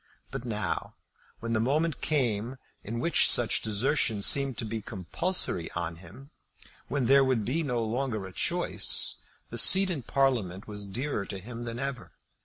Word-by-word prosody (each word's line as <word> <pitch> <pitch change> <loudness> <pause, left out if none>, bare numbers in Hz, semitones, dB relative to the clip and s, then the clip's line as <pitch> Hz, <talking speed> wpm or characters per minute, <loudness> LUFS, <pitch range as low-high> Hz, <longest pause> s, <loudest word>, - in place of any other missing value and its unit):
But 130 -2 -6
now, 110 -3 -4 0.5
when 115 0 -3
the 110 - +1
moment 150 +6 0
came 125 -4 -1 0.3
in 115 +3 -5
which 165 +6 +4
such 120 -2 +2
desertion 110 -1 0
seemed 135 -1 +5
to - - -4
be 110 0 -5
compulsory 105 - -1
on 85 -1 -4
him, 95 - -14 0.6
when 140 -2 -1
there 135 +3 +5
would 130 -5 0
be 150 +7 -1
no 125 -6 -2
longer 110 -2 -3
a 95 - -10
choice, - - 0 0.3
the - - -1
seat 190 0 +8
in 155 -6 -3
Parliament 115 -8 -1
was 105 -1 -5
dearer 115 0 -4
to 100 - -6
him 115 +5 -8
than 115 0 -6
ever. 135 -1 -5
120 Hz, 165 wpm, -28 LUFS, 105-135 Hz, 0.6 s, seat